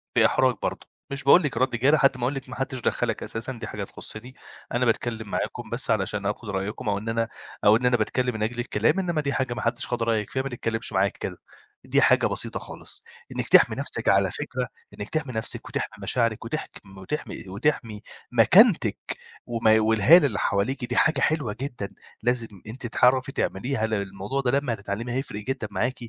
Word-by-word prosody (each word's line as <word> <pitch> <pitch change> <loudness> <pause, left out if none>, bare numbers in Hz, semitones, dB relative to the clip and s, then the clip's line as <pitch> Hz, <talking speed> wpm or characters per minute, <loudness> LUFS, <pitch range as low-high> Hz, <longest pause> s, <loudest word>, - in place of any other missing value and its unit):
بإحراج 130 -2 +4
برضه، - - -3 0.2
مش 140 0 -4
باقول 170 +6 +7
لكِ 135 -5 -2
رَد 130 +3 +3
جارِح 135 +6 +4
لحد 135 -2 +4
ما 125 - -5
أقول 130 +3 +1
لِك 135 -1 -6
ماحدّش 130 0 -3
دخّلك 115 -1 -1
أساسًا، 115 +4 -3
دي 120 - -7
حاجة - - -5
تخصّني، 125 +4 -9 0.4
أنا 120 +1 +2
باتكلّم 115 -2 -1
معاكم 115 +3 -3
بس 115 +2 -1
علشان 105 -1 -1
آخُد 105 +2 -3
رأيكم 100 +2 -3
أو 100 - +1
إن 110 +3 -5
أنا 115 0 0 0.4
أو 105 - +8
إن 120 +3 0
أنا 125 0 +4
باتكلّم 125 +3 0
من 110 -1 -2
أجل 120 +2 -1
الكلام، 120 - +1
إنما 175 -5 0
دي 140 -1 -1
حاجة 130 -2 -1
ماحدّش 120 -1 -2
خَد 120 -2 -1
رأيك 110 -2 0
فيها، 130 - -1
ما 135 - -3
تتكلّمش 115 -3 -3
معايا 95 +1 +3
كده، - - -4 0.5
دي - - +3
حاجة - - +5
بسيطة - - -2
خالص، - - -8 0.3
إنِك - - -2
تحْمي - - +6
نفسِك، - - -2
على - - +4
فكرة - - -3 0.3
إنِك 105 - -5
تحْمي 150 -5 -2
نفسِك 110 -1 -2
وتحْمي - - -4
مشاعرِك 115 -3 0
وتحك 155 +7 -4
م 95 0 -14
وتحْمي 95 +11 -5
وتحْمي 105 0 -1 0.3
مكانتِك 125 - +5 0.5
وماي 110 -2 +4
والهالة 110 - +6
اللي 105 -5 -3
حواليكِ 120 +7 0
دي 120 0 -3
حاجة 155 -2 +3
حلوة 140 -10 +1
جدًا 120 -8 -4 0.3
لازم 115 -6 0
أنتِ 120 +2 -6
تعرَفي 130 +3 +3
تعمليها 110 +1 -1
لأن 110 -2 0
الموضوع 100 +7 -3
ده 125 -2 +1
لمّا 135 -4 -2
هتتعلّميه 105 +3 -4
هيفرِق 130 -5 -3
جدًا 130 -2 -3
معاكِ، 125 +6 0
120 Hz, 195 wpm, -25 LUFS, 110-130 Hz, 0.5 s, أو